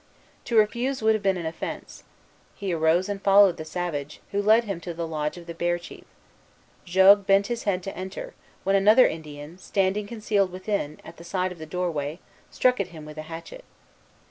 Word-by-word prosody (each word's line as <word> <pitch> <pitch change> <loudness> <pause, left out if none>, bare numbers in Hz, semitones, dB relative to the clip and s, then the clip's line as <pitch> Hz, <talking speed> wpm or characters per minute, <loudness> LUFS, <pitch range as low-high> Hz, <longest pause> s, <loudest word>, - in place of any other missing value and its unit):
To 235 -1 0
refuse 235 +4 +1
would 220 0 +5
have 215 - -1
been 195 -2 +1
an 170 - -5
offence. 160 - -6 0.5
He 195 -3 -3
arose 165 +3 +2
and 200 -1 -4
followed 195 -2 +6
the 155 - -5
savage, 155 -4 -4
who 200 - 0
led 220 +3 +5
him 195 -6 -5
to 170 -1 -6
the 170 0 -3
lodge 155 0 -3
of 175 - -10
the 170 - -7
Bear 175 +1 0
chief. 175 - -12 0.8
Jogues 190 +2 +6
bent 195 +1 +4
his 235 - -6
head 185 -3 0
to 195 - -6
enter, 190 +1 -7 0.3
when 195 +1 +2
another 210 +6 +6
Indian, 150 +1 -8
standing 195 +2 0
concealed 210 -4 0
within, 185 -5 -3
at - - -11
the 170 - -11
side 185 +1 -2
of 180 - -10
the 160 - -8
doorway, 160 -3 -2 0.3
struck 250 -2 +2
at 200 - -1
him 160 -4 -11
with 150 0 -9
a 155 +1 -8
hatchet. 170 - -9
185 Hz, 195 wpm, -25 LUFS, 165-200 Hz, 0.8 s, followed